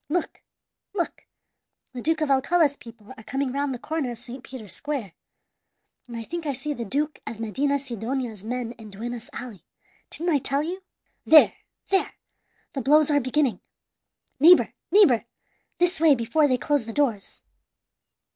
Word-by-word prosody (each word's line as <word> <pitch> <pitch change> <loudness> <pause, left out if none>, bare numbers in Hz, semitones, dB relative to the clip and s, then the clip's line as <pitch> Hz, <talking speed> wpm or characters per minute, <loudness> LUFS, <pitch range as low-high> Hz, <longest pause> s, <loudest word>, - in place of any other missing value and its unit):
Look, 345 +3 -2 0.5
look! 345 -4 -3 0.7
the 250 - -6
Duke 320 +4 0
of 300 -2 +1
Alcala's 285 +2 +3
people 230 -2 -13
are 220 - -13
coming 270 +3 -2
round 280 +1 -1
the 255 - -3
corner 310 +1 -3
of 240 - -6
Saint 245 +3 -9
Peter's 220 -8 -9
Square, 275 - -3 1.0
and 235 -1 -7
I 230 - -5
think 335 +5 -5
I 285 - 0
see 295 +4 -4
the 240 - -5
Duke 290 +8 -2
of 220 - -5
Medinasidonia's 250 -2 -2
men 240 +1 -3
in 220 -1 -10
Duenas 235 +3 -6
Alley. 235 -7 -8 0.5
Didn't 340 +2 -1
I 290 - +3
tell 275 +2 +1
you? 360 +4 -4 0.4
There 315 -1 +7 0.4
there! 385 -1 +1 0.6
The 275 - -2
blows 300 +3 +4
are 290 - +4
beginning. 260 -5 0 0.8
Neighbor, 340 +5 +7 0.2
neighbor, 275 - +5 0.5
this 355 -1 +2
way 315 -3 +6
before 290 +6 +2
they 255 -2 +2
close 285 -3 0
the 225 - -5
doors! 235 -8 -1
270 Hz, 155 wpm, -25 LUFS, 235-300 Hz, 1.0 s, There